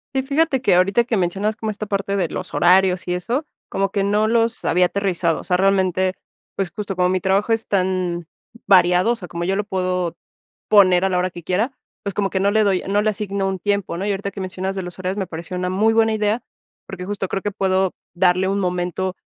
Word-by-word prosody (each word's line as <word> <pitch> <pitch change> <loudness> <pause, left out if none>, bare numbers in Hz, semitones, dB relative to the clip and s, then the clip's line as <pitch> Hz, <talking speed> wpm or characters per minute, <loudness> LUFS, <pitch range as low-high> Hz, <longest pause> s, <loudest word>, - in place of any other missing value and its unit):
Sí, 265 - +1
fíjate 280 -1 +1
que 220 - +3
ahorita 195 +6 +3
que 235 - -1
mencionas 195 +3 0
como 220 0 -4
esta 215 +1 -5
parte 200 0 -2
de 180 -3 +1
los 180 - -6
horarios 180 0 +3
y 180 - 0
eso, 240 - -2 0.2
como 195 -1 -1
que 200 -1 0
no 210 +2 +2
los 230 0 +1
había 180 +1 +3
aterrizado. 180 -5 0
O - - -9
sea, 180 - +1
realmente, 185 -1 +2 0.4
pues, 195 -3 -1
justo 200 -2 -5
como 180 0 +3
mi 185 -1 0
trabajo 200 +4 +2
es 225 0 -1
tan 185 -3 -1 0.4
variado, 180 +3 +5
o - - +1
sea, 185 -6 -9
como 170 0 -4
yo 195 - 0
lo 205 - 0
puedo 180 -3 -2 0.5
poner 185 -3 +5
a 190 - +2
la 180 - 0
hora 180 +1 +1
que 175 -1 -11
quiera, 210 - 0 0.3
pues, 200 - -3
como 195 +1 0
que 190 - -1
no 200 +1 +3
le 220 +1 +3
doy 195 -3 +1
no 205 +1 +2
le 215 - +2
asigno 200 -2 -2
un 190 -1 -2
tiempo, 200 -2 -1
¿no? 195 - -3
Y 205 - 0
ahorita 200 0 -3
que 195 - -7
mencionas 190 +1 -4
de 190 - -2
los 180 +1 -9
horarios 185 +1 -2
me 190 -2 -2
pareció 170 +1 -6
una 180 0 -2
muy 215 +4 +2
buena 225 0 +3
idea, 215 +2 0 0.4
porque 180 -1 -7
justo 195 -1 -3
creo 195 - -2
que 205 - -2
puedo 190 -1 +1 0.2
darle 185 +1 +2
un 200 +1 0
momento 180 0 -2
190 Hz, 235 wpm, -21 LUFS, 180-205 Hz, 0.5 s, variado